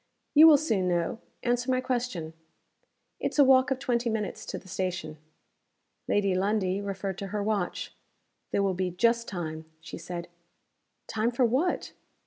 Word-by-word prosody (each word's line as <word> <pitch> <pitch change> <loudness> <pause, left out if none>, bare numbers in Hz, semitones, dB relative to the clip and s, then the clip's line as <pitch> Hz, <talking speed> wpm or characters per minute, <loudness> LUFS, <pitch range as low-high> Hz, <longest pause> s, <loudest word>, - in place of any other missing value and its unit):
"You 315 +2 +9
will 305 -2 +8
soon 215 - 0
know. 175 +5 0 0.2
Answer 245 +1 0
my 255 0 +2
question." 245 -11 -3 0.9
"It's - - -2
a 285 - +8
walk 265 0 +5
of 265 - 0
twenty 240 -2 0
minutes 220 -2 -3
to - - -4
the - - -13
station." 180 -4 -3 0.9
Lady 200 -2 +2
Lundie 195 0 0
referred 195 -1 -4
to 200 - -4
her 205 +1 -2
watch. 205 -4 -2 0.6
"There 200 - +1
will 195 -1 +1
be 185 0 -1
just 230 +6 +1
time," 160 -4 -5
she 165 +1 -9
said. 175 +1 -6 0.8
"Time 220 +1 0
for 245 +1 +2
what?" 270 +10 0
205 Hz, 155 wpm, -28 LUFS, 185-245 Hz, 0.9 s, You